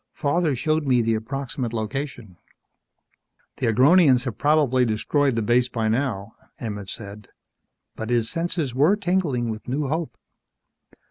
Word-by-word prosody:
Father 150 0 0
showed 155 +3 0
me 125 -3 +3
the 115 0 +1
approximate 125 +1 -4
location 115 -3 -5 0.6
" - - -45
"The 125 - -1
Agronians 130 +2 +5
have 120 -5 -3
probably 145 -4 +3
destroyed 125 +4 +1
the 115 - 0
base 120 +3 +2
by 115 -3 -1
now," 110 -4 -2 0.3
Emmett 105 -4 -5
said. 105 0 -8 0.7
But 110 - -5
his 120 -2 +1
senses 165 -4 -2
were 150 +10 +4
tingling 175 - 0
with 110 -1 -8
new 135 +2 -2
hope. 155 -5 -3
125 Hz, 140 wpm, -23 LUFS, 115-145 Hz, 0.7 s, Agronians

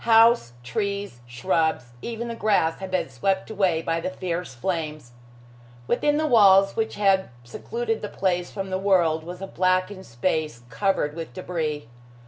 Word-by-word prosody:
House, 225 - +5
trees, 200 - -3
shrubs, 125 +1 0
even 235 0 -5
the 235 - -4
grass 205 -8 +1
had 190 - -6
been 185 0 0
swept 195 +1 -1
away 185 -6 +1
by 165 0 0
the 165 - -3
fierce 180 -6 -4
flames. 155 -3 -3 0.7
Within 295 - +1
the 310 - +1
walls 195 -7 +6
which 220 -1 -1
had 195 -2 +2
secluded 225 - -4
the 210 - -4
place 180 -2 -1
from 195 -1 -5
the 185 - -1
world 175 -5 +2
was 180 +3 -8
a - - -4
blackened 185 +1 0
space 120 0 -2
covered 150 +2 0
with 165 -1 -7
debris. 160 -8 -3
185 Hz, 155 wpm, -24 LUFS, 160-200 Hz, 0.7 s, walls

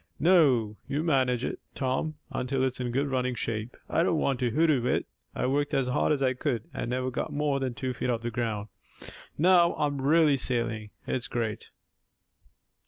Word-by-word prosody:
"No, 135 - +4
you 145 +3 -1
manage 130 -6 +2
it, - - -4 0.2
Tom, 135 +4 -1 0.2
until 130 +1 -1
it's 130 -1 -1
in 125 -1 -2
good 135 +4 0
running 125 -2 -1
shape. 115 0 -3
I - - +1
don't 170 -1 +2
want 135 -4 0
to 125 -2 +1
'hoodoo' 145 -2 +2
it. - - +1 0.3
I - - -1
worked 145 +2 0
as 135 -2 +1
hard 140 - +1
as 140 -2 +1
I 130 -1 +3
could, 125 -4 -2
and - - -3
never 130 +1 -1
got 125 - -3
more 145 -1 0
than 130 -3 -2
two 130 -3 -3
feet 125 - -3
off 115 -2 0
the 120 0 -3
ground. 110 -3 -2 0.7
Now 175 +1 +5
I'm 145 -2 -1
really 150 0 +4
sailing. 115 -4 -2 0.2
It's 125 - -2
great!" 110 -3 -3
130 Hz, 185 wpm, -28 LUFS, 120-145 Hz, 0.7 s, Now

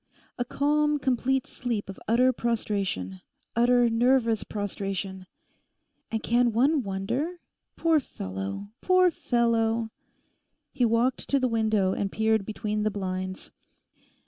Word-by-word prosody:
A - - +2
calm, 295 +3 +1
complete 265 -1 0
sleep 235 -4 -3
of 195 - -8
utter 250 +4 +4
prostration—utter 225 - 0
nervous 230 -1 +2
prostration. 195 -2 -4 0.8
And 225 -1 -3
can 240 0 +2
one 275 +6 +3
wonder? 225 - -2 0.4
Poor 325 -2 +3
fellow, 95 - -6
poor 370 -1 +4
fellow!' 230 -4 +1 0.8
He 250 -3 +2
walked 235 +3 +1
to 280 - +3
the 255 - +2
window 215 -5 +1
and 195 -1 -2
peered 220 -2 +1
between 210 -1 -2
the 215 - +1
blinds. 185 -2 -4
225 Hz, 115 wpm, -27 LUFS, 200-255 Hz, 0.8 s, utter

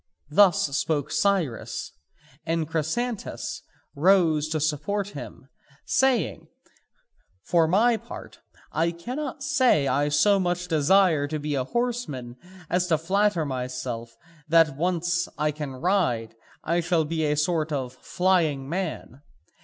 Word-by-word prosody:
Thus 170 -5 +4
spoke 150 -2 -1
Cyrus, 185 - -1 0.5
and 165 -1 -1
Chrysantas 190 +9 -3 0.3
rose 160 -2 +3
to 155 0 -1
support 160 +7 -1
him, 135 -5 -9 0.4
saying: 265 -4 +1 1.0
"For 165 -2 +3
my 225 +7 +3
part 235 +3 -10 0.3
I 165 +1 +1
cannot 260 - -5
say 260 - +3
I 145 +3 +1
so 195 +8 +4
much 180 -1 -1
desire 160 -1 +3
to 155 +1 -3
be 150 0 -3
a 130 -2 -1
horseman 230 - -3 0.3
as 180 +2 0
flatter 175 +2 +2
myself 125 -3 -5 0.3
that 160 -3 +4
once 175 +2 0
I 150 0 +1
can 150 -2 -6
ride 130 - 0 0.3
I 170 +2 +1
shall 170 -2 +1
be 160 +1 -2
a 150 0 +1
sort 160 0 0
of 130 -4 -3
flying 160 -2 0
man. 160 -5 -4
160 Hz, 120 wpm, -25 LUFS, 145-190 Hz, 1.0 s, Thus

